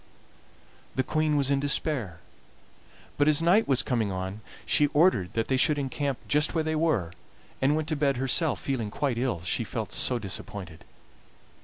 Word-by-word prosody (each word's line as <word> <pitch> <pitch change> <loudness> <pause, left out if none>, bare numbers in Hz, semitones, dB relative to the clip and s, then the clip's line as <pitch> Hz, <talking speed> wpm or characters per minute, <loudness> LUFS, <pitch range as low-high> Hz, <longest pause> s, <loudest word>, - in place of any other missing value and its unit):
"The 130 - +1
Queen 155 +2 0
was 140 -1 +1
in 140 - +2
despair, 135 - -1 1.0
but 145 - +4
as 150 -1 +5
night 180 +7 +3
was 135 -2 +3
coming 115 -6 -1
on 95 +3 -5 0.2
she 145 +6 +3
ordered 145 - +3
that 115 -1 0
they 130 - +1
should 150 +3 +3
encamp 140 -1 -3
just 150 +3 +2
where 160 - +1
they 155 0 -1
were, 155 - 0 0.5
and 140 +3 +3
went 155 0 -2
to 155 - 0
bed 140 -3 +1
herself, 135 +5 +1
feeling 125 -6 -3
quite 135 +1 -2
ill, 120 -10 -1
she 90 - -1
was - - -5
so 125 - +2
disappointed. 100 -4 -7
135 Hz, 170 wpm, -27 LUFS, 110-150 Hz, 1.0 s, as